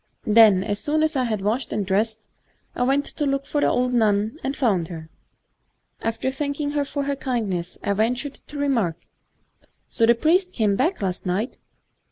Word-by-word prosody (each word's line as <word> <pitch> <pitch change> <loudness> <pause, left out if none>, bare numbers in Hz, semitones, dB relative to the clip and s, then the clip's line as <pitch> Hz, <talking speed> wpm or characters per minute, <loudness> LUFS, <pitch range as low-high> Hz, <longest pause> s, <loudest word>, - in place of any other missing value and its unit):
Then, 210 -3 +6
as 205 0 -2
soon 310 +1 0
as 315 0 0
I 255 -2 +1
had 215 -4 -2
washed 225 +6 -1
and 205 -2 -1
dressed, 215 +3 -1 0.5
I - - -5
went 275 +3 +2
to 295 - -3
look 275 0 -1
for 295 - -1
the - - +3
old 250 0 +1
nun, 220 +3 +1
and 270 +1 -2
found 195 -10 +1
her. 160 -2 -9 0.9
After 225 +3 -1
thanking 285 +1 -2
her 290 -1 0
for 285 0 -3
her 280 0 -1
kind 245 -6 -2
ness, 175 0 -4
I 200 - +1
ventured 245 +7 0
to 295 - -8
remark, 235 - 0 0.9
*So 225 - +2
the 235 - +6
priest 360 +8 +2
came 210 -4 +1
back 305 - 0
last 185 -1 -3
night 200 +8 -2
235 Hz, 190 wpm, -23 LUFS, 205-280 Hz, 0.9 s, Then